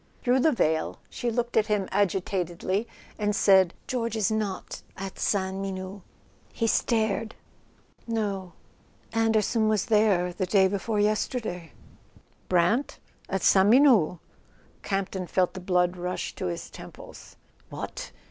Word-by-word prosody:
Through 250 +1 +3
the 315 +4 +4
veil 160 - 0
she 245 - -2
looked 240 +1 -2
at 215 -1 +3
him 210 -3 0
agitatedly, 190 +1 -1 0.3
and 210 0 0
said: 190 -3 +4
"George 235 -3 -2
is 220 0 +1
not 215 -3 -3 0.2
at 195 0 -7
Sainte 190 -1 0
Menehould." 190 0 -5 0.5
He 230 - -2
stared. 220 -1 0 0.7
"No. 200 -6 -2 0.6
Anderson 225 0 +2
was 215 -3 +1
there 210 -6 +2
the 185 0 -2
day 190 0 +4
before 205 +2 -2
yesterday." 210 - -1 0.8
"Brant? 180 +10 +2 0.3
At 195 -2 -2
Sainte 195 +1 +5
Menehould?" 235 - +5 0.6
Campton 195 -2 -3
felt 185 0 +1
the 185 - -6
blood 180 -1 +1
rush 180 0 -4
to - - -4
his 85 -1 -5
temples. - - -12 0.3
What! - - -6
200 Hz, 130 wpm, -27 LUFS, 185-220 Hz, 0.8 s, Sainte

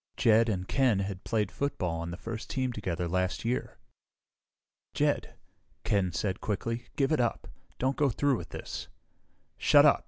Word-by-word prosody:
Jed 115 +1 +5
and 95 -3 -1
Ken 130 -6 +3
had 95 -1 -4
played 105 -4 0
football 90 -12 -2
on 85 0 -4
the 85 - -5
first 115 +2 -6
team 130 -2 -1
together 90 -5 -2
last 95 +4 -1
year. 120 +2 -1 1.2
"Jed," - - +1 0.5
Ken 95 -3 +1
said 95 +3 -2
quickly, 115 +3 -2
"give 135 +1 +2
it 155 - +3
up! 120 -2 0 0.3
Don't 130 +2 0
go 145 -2 +3
through 140 +2 +2
with - - -8
this!" - - -6 0.7
"Shut - - +7
up!" - - +6
110 Hz, 160 wpm, -30 LUFS, 95-125 Hz, 1.2 s, Shut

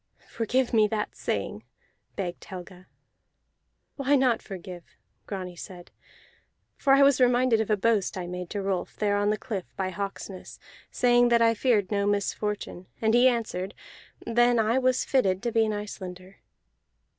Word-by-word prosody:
"Forgive 245 +3 -1
me 215 -2 +5
that 210 0 -3
saying," - - -3 0.5
begged 180 -3 -4
Helga. 185 0 -10 1.1
"Why 280 0 +2
not 255 -4 +2
forgive?" 180 -3 -9 0.4
Grani 185 -3 -5
said. 175 0 -10 0.8
"For 270 - +3
I 275 +1 +6
was 275 -2 +4
reminded 245 -2 +4
of 220 - -3
a 210 - +3
boast 210 -1 +1
I 180 - -4
made 180 0 -6
to 205 -1 -3
Rolf 190 -2 -2
there 205 -1 0
on 205 0 +1
the 210 - +1
cliff 205 -7 -6
by 185 -1 -2
Hawksness, 195 0 -6 0.3
saying 245 -1 +3
that 235 -1 +4
I 230 0 +4
feared 220 -4 +1
no 200 -1 +1
misfortune. 205 -2 -2
And 220 0 +2
he 245 +2 +6
answered: 215 -6 -1 0.5
Then 240 +1 +3
I 225 +3 +2
was 255 -1 +1
fitted 195 -8 +1
to 240 - -1
be 225 -1 +3
an - - -1
Icelander. 190 -2 -7
210 Hz, 155 wpm, -27 LUFS, 190-240 Hz, 1.1 s, I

